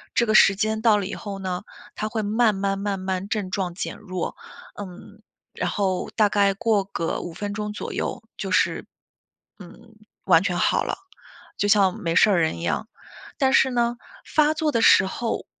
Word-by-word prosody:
这 235 Hz, -, +3 dB
个 215 Hz, -, +1 dB
时 195 Hz, -, +7 dB
间 220 Hz, +1 st, -1 dB
到 220 Hz, -3 st, +5 dB
了 200 Hz, -, -2 dB
以 205 Hz, -, -5 dB
后 200 Hz, -2 st, -6 dB
呢， 185 Hz, -1 st, -3 dB, 0.3 s
它 215 Hz, 0 st, -3 dB
会 220 Hz, -1 st, -2 dB
慢 215 Hz, 0 st, +2 dB
慢 195 Hz, 0 st, -1 dB
慢 200 Hz, -1 st, -2 dB
慢 190 Hz, +1 st, -3 dB
症 200 Hz, -4 st, -2 dB
状 185 Hz, -4 st, -2 dB
减 -, -, -4 dB
弱。 185 Hz, -4 st, -5 dB, 0.4 s
嗯， 205 Hz, +2 st, -10 dB, 0.3 s
然 -, -, -2 dB
后 190 Hz, -3 st, -1 dB
大 215 Hz, -2 st, +4 dB
概 200 Hz, -1 st, +3 dB
过 210 Hz, -1 st, +1 dB
个 165 Hz, -4 st, -3 dB
5 175 Hz, -, -7 dB
分 205 Hz, +2 st, -5 dB
钟 210 Hz, 0 st, -4 dB
左 -, -, -6 dB
右， -, -, -3 dB
就 -, -, -4 dB
是 -, -, +1 dB, 0.7 s
嗯， 200 Hz, +5 st, -14 dB, 0.3 s
完 165 Hz, -, +5 dB
全 180 Hz, -2 st, -1 dB
好 -, -, +2 dB
了， -, -, -3 dB, 0.6 s
就 205 Hz, -, +1 dB
像 195 Hz, -3 st, +4 dB
没 165 Hz, -1 st, -1 dB
事 215 Hz, -, +6 dB
儿 180 Hz, -, +3 dB
人 160 Hz, -, 0 dB
一 -, -, -6 dB
样。 220 Hz, -, -1 dB, 0.5 s
但 265 Hz, -2 st, +2 dB
是 265 Hz, -, +5 dB
呢， 240 Hz, 0 st, 0 dB, 0.3 s
发 305 Hz, 0 st, +3 dB
作 305 Hz, -1 st, 0 dB
的 230 Hz, -, +1 dB
时 190 Hz, -, +6 dB
候， 225 Hz, +4 st, -3 dB
205 Hz, 205 characters per minute, -24 LUFS, 190-220 Hz, 0.7 s, 时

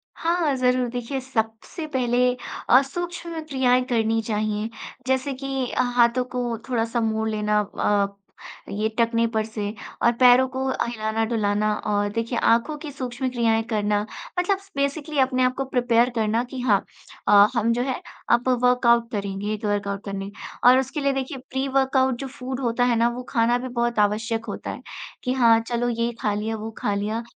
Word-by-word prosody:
हाँ 330 Hz, -4 st, +1 dB
ज़रूर, 250 Hz, -1 st, +2 dB
देखिए 245 Hz, +3 st, -3 dB
सबसे 225 Hz, +5 st, -3 dB
पहले 245 Hz, -1 st, +1 dB, 0.5 s
अ, 255 Hz, +2 st, +8 dB
सूक्ष्म 340 Hz, +3 st, -5 dB
क्रियाएँ 255 Hz, -2 st, +3 dB
करनी 225 Hz, -2 st, +1 dB
चाहिए, 215 Hz, 0 st, -1 dB, 0.4 s
जैसे 265 Hz, +1 st, 0 dB
कि 270 Hz, -1 st, -3 dB
अ, -, -, +1 dB
हाथों 240 Hz, +1 st, +4 dB
को 240 Hz, -2 st, -1 dB
थोड़ा-सा 230 Hz, -1 st, 0 dB
मोड़ 220 Hz, 0 st, 0 dB
लेना 210 Hz, 0 st, +1 dB, 0.2 s
अ, 200 Hz, -1 st, +2 dB, 0.6 s
ये 210 Hz, +2 st, -1 dB
टखने 230 Hz, 0 st, +3 dB
पर 220 Hz, 0 st, +1 dB
से 210 Hz, -1 st, -4 dB, 0.3 s
और 235 Hz, -, +6 dB
पैरों 255 Hz, +1 st, +7 dB
को 260 Hz, +1 st, -3 dB
अ, 260 Hz, -, 0 dB
हिलाना-डुलाना 220 Hz, -2 st, 0 dB
अ, 205 Hz, -1 st, -1 dB
देखिए 230 Hz, +1 st, -1 dB
आँखों 235 Hz, +8 st, +2 dB
की 295 Hz, -1 st, -7 dB
सूक्ष्म 255 Hz, -1 st, -3 dB
क्रियाएँ 230 Hz, -2 st, +1 dB
करना 205 Hz, -1 st, +1 dB, 0.4 s
मतलब 380 Hz, +2 st, +2 dB
स 390 Hz, 0 st, -20 dB
बेसिकली 285 Hz, +1 st, -1 dB
अपने 255 Hz, -1 st, +2 dB
आप 255 Hz, -, +2 dB
को 270 Hz, -, -1 dB
प्रिपेयर 245 Hz, -2 st, +2 dB
करना 225 Hz, +2 st, +1 dB
कि 260 Hz, -, -4 dB
हाँ 210 Hz, -5 st, +3 dB, 0.4 s
अ, 205 Hz, 0 st, +8 dB
हम 230 Hz, 0 st, +2 dB
जो 245 Hz, -, 0 dB
है 260 Hz, -1 st, -3 dB, 0.3 s
अब 240 Hz, +1 st, +3 dB, 0.2 s
वर्कआउट 235 Hz, -2 st, +4 dB
करेंगे। 200 Hz, -1 st, -3 dB
ये 215 Hz, 0 st, -1 dB
तो 210 Hz, 0 st, -4 dB
वर्कआउट 200 Hz, -1 st, -2 dB
करने 195 Hz, 0 st, -5 dB, 0.4 s
और 255 Hz, +1 st, +8 dB
उसके 265 Hz, +3 st, -3 dB
लिए 275 Hz, 0 st, +2 dB
देखिए 270 Hz, 0 st, -3 dB
प्री-वर्कआउट 265 Hz, -1 st, +1 dB
जो 270 Hz, -, -4 dB
फूड 260 Hz, -1 st, -6 dB
होता 245 Hz, -1 st, 0 dB
है 245 Hz, -1 st, +3 dB
ना, 235 Hz, +1 st, +3 dB
वो 250 Hz, +1 st, -6 dB
खाना 235 Hz, 0 st, +2 dB
भी 255 Hz, +1 st, -5 dB
बहुत 240 Hz, -2 st, -1 dB
आवश्यक 225 Hz, +2 st, 0 dB
होता 205 Hz, -, -5 dB
है -, -, -8 dB, 0.4 s
कि 250 Hz, -, 0 dB
हाँ, 230 Hz, -3 st, +5 dB
चलो 240 Hz, 0 st, 0 dB
ये 235 Hz, 0 st, -1 dB
खा 210 Hz, -1 st, +1 dB
लिया, 220 Hz, +2 st, -2 dB
वो 220 Hz, +1 st, -6 dB
खा 205 Hz, -, -1 dB
लिया, 215 Hz, +3 st, -2 dB
235 Hz, 180 wpm, -24 LUFS, 220-260 Hz, 0.6 s, अ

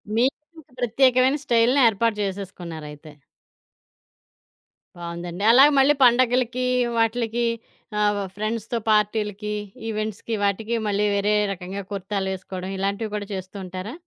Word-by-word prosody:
మీకంటూ 300 Hz, +7 st, -1 dB, 0.2 s
ప్రత్యేకమైన 255 Hz, +3 st, +3 dB
స్టైల్‌ని 240 Hz, +4 st, +3 dB
ఏర్పాటు 225 Hz, +1 st, +1 dB
చేసేసుకున్నారయితే. 170 Hz, -6 st, -7 dB, 1.9 s
బావుందండి. 170 Hz, +2 st, -6 dB
అలాగే 270 Hz, +5 st, +7 dB
మళ్ళీ 275 Hz, +2 st, +5 dB
పండుగలకి 250 Hz, 0 st, +2 dB, 0.3 s
వాటిలకి 230 Hz, +1 st, 0 dB, 0.5 s
ఆహ్, 205 Hz, -1 st, +2 dB, 0.2 s
ఫ్రెండ్స్‌తో 220 Hz, +2 st, -3 dB
పార్టీలకి, 210 Hz, 0 st, 0 dB, 0.3 s
ఈవెంట్స్‌కి, 215 Hz, 0 st, -4 dB
వాటికి 215 Hz, +3 st, 0 dB
మళ్ళీ 205 Hz, 0 st, +1 dB
వేరే 205 Hz, +1 st, +1 dB, 0.2 s
రకంగా 190 Hz, +2 st, -6 dB
కుర్తాలు 195 Hz, 0 st, -3 dB
వేసుకోవడం. 185 Hz, 0 st, -6 dB
ఇలాంటివి 200 Hz, +3 st, -2 dB
కూడా 205 Hz, -1 st, -3 dB
చేస్తూ 185 Hz, +1 st, -7 dB
ఉంటారా? 185 Hz, +4 st, -6 dB
210 Hz, 100 wpm, -23 LUFS, 195-235 Hz, 1.9 s, అలాగే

